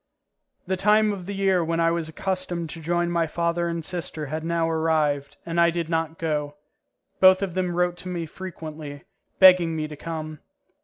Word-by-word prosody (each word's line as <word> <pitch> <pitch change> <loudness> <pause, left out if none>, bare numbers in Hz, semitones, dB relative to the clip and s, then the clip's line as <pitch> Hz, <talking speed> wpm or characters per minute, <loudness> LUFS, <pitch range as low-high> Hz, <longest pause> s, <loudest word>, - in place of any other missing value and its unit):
The 190 - -1
time 210 +2 +3
of 185 -3 -7
the 200 - -4
year 190 -3 +2
when 165 +1 -1
I 165 0 +3
was 165 -2 -2
accustomed 180 -1 -3
to 165 - -8
join 175 +1 0
my 170 -1 +1
father 170 +1 -1
and 170 -2 -3
sister 160 -3 -4
had 155 +3 -4
now 165 0 0
arrived, 155 -3 0
and 170 0 +1
I 170 - +5
did 170 -1 -3
not 165 -1 -1
go; 150 -3 -2 0.6
both 185 +1 +6
of 190 -3 -3
them 180 -1 -1
wrote 175 0 +1
to 180 - -8
me 175 -2 -3
frequently, 155 -4 -8 0.4
begging 180 -3 +7
me 155 -1 -2
to 150 - -8
come. 155 -1 -6
170 Hz, 190 wpm, -24 LUFS, 160-180 Hz, 0.6 s, begging